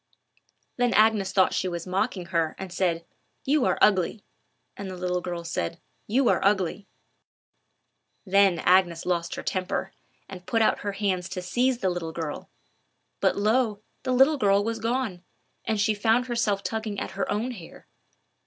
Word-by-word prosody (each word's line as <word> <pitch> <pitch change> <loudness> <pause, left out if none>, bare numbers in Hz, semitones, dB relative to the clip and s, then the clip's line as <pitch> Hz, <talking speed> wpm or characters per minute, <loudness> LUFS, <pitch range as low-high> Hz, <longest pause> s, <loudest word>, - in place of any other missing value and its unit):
Then 245 -1 +2
Agnes 215 -3 +4
thought 190 -1 +3
she 185 - 0
was 170 -2 -4
mocking 185 0 -1
her, 165 -2 +1
and 190 -2 -7
said, 170 -2 0 0.4
"You 285 -1 +2
are - - +1
ugly;" 200 +1 +3 0.5
and 200 -1 -6
the 185 - -7
little 180 0 -1
girl 175 -1 -5
said, 165 - -3 0.3
"You 250 +4 +2
are - - +2
ugly." 195 0 +1 1.4
Then 195 -2 +4
Agnes 175 -2 +3
lost 170 -2 -1
her - - -6
temper, 185 0 -2 0.3
and 185 -2 -10
put 225 -1 +2
out - - +2
her 205 -1 -3
hands 190 -3 -1
to 180 - -4
seize 245 +6 0
the 190 - +2
little 165 -2 -4
girl; 160 -3 -5 0.7
but - - +2
lo! 215 0 +1 0.2
the 260 - -2
little 270 +4 +5
girl 200 -4 +3
was 225 +1 -2
gone, 225 -5 -2 0.4
and 220 -1 0
she 215 +1 +3
found 225 +4 +2
herself 230 -5 0
tugging 220 -2 -3
at - - -4
her - - -3
own 225 +5 -1
hair. 180 -9 -11
200 Hz, 165 wpm, -26 LUFS, 180-225 Hz, 1.4 s, little